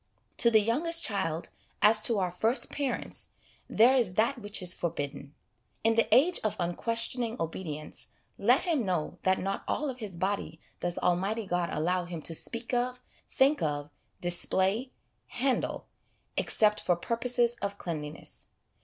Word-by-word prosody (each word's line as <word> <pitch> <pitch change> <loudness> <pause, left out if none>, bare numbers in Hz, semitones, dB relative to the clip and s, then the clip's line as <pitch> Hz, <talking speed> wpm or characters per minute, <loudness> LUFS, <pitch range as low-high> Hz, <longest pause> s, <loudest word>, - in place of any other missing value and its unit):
To 235 - +5
the 220 -2 +5
youngest 330 +10 +2
child, 165 -5 -1 0.3
as 215 +1 +5
to 230 - +5
our 185 -2 0
first 220 +8 +2
parents, 280 -3 -2 0.4
there 245 +4 +5
is 230 -8 +2
that 235 +5 +1
which 205 0 0
is 180 0 +3
forbidden. 145 -3 -5 0.5
In 225 +1 +4
the 230 0 +1
age 345 +7 +5
of 215 - 0
unquestioning 230 +6 0
obedience, 160 -2 -4 0.3
let - - +4
him 320 -8 +1
know 180 -6 -2
that 190 0 +2
not 195 +1 -3
all 295 -2 -1
of 255 - -12
his 200 -6 -6
body 190 -3 -2 0.2
does 175 0 -2
Almighty 195 +5 0
God 175 -2 -1
allow 175 +3 0
him 170 -3 -7
to 165 - -3
speak 230 +9 -2
of, 250 +1 0 0.3
think 280 +3 +3
of, 145 -1 -2 0.3
display, 190 +7 0 0.4
handle, 260 +1 -1 0.5
except 210 -1 +2
for 175 - +2
purposes 240 +5 0
of 200 0 -3
cleanliness. 155 -4 -7
205 Hz, 150 wpm, -29 LUFS, 175-240 Hz, 0.5 s, To